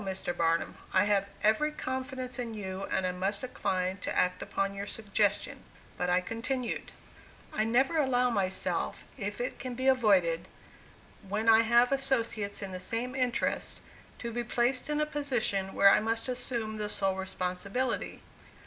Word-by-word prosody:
Mr. 190 -2 -3
Barnum; 165 -1 +1 0.2
I 185 - +4
have 200 -1 +2
every 220 +9 +3
confidence 260 -2 -4
in 230 -2 -4
you 190 -2 -4
and 190 - 0
I 180 - +1
must 195 +3 -1
decline 190 -6 -1
to 200 - -3
act 180 0 +2
upon 195 0 -1
your 200 +1 -5
suggestion"; 205 -1 0 0.4
but 180 - -1
I 180 +1 +3
continued: 230 +5 -3 0.6
"I 215 - +1
never 265 +8 +2
allow 250 -4 +3
myself, 190 -4 -1
if 205 -4 -4
it 245 - -3
can 250 0 -5
be 260 +2 -2
avoided, 195 -10 +3 0.8
when 215 +3 -1
I 225 0 +8
have 235 +2 +4
associates 230 -7 0
in 195 - -5
the 185 - -5
same 230 +7 -2
interests, 255 -2 0 0.4
to 235 - -5
be 240 +1 -1
placed 245 +3 +1
in 300 0 +1
a 300 - +3
position 245 -10 -1
where 200 0 +7
I - - +6
must 225 +2 -1
assume 235 -3 -2
the 210 -1 -2
sole 195 -2 +1
responsibility. 190 +6 -2
220 Hz, 160 wpm, -30 LUFS, 195-250 Hz, 0.8 s, I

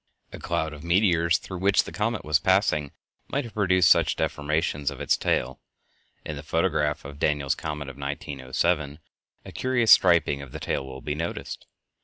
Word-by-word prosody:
A - - -8
cloud 80 -2 -2
of 75 0 -10
meteors 85 -2 +3
through 95 -2 -8
which 100 +2 +3
the - - -9
comet 105 +2 -2
was 75 0 +3
passing 95 -5 +1 0.4
might 140 +1 -2
have 115 - -10
produced 95 -4 +3
such - - +4
deformations 75 -1 -1
of 70 - -8
its - - +2
tail. - - -1 0.6
In 75 - -5
the 70 - -7
photograph 75 -1 0
of 70 +1 -9
Daniels' 75 -3 +1
comet 75 -2 -5
of 70 -1 -9
1907, 70 +2 -2 0.5
a - - -9
curious 125 -3 +1
striping 85 -6 +5
of 70 -3 -11
the - - -6
tail - - -2
will 65 0 -9
be 75 - -3
noticed. 80 +3 -5
75 Hz, 175 wpm, -25 LUFS, 70-95 Hz, 0.6 s, striping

